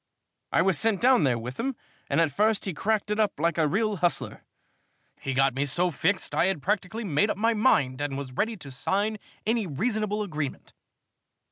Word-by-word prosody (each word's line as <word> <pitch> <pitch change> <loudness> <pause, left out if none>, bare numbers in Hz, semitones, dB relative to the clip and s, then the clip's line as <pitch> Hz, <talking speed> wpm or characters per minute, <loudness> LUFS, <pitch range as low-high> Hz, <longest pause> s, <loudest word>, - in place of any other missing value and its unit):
I 165 - +3
was 185 -5 +2
sent 220 -4 +2
down 250 - +4
there 125 -3 +2
with 125 +3 -7
him 265 +2 -1 0.3
and - - +2
at 165 -3 +3
first 215 +4 +2
he 190 - -2
cracked 210 +5 -1
it 210 - 0
up 210 -8 +1
like 170 +1 +1
a 155 - +3
real 210 +5 0
hustler. 175 0 0 0.8
He 135 -1 -3
got 135 0 +3
me 135 +2 0
so 175 +6 +1
fixed 185 +6 0
that - - -2
I - - +5
had 190 -7 -2
practically 210 +3 -1
made 195 +2 +1
up - - -1
my 225 +3 +2
mind 145 - +2
and 145 -2 -2
was 140 -2 -6
ready 220 - -1
to 140 -6 -10
sign 205 +10 -1 0.3
any 225 -2 +1
reasonable 210 - -1
agreement. 155 -7 -5
190 Hz, 205 wpm, -27 LUFS, 145-215 Hz, 0.8 s, I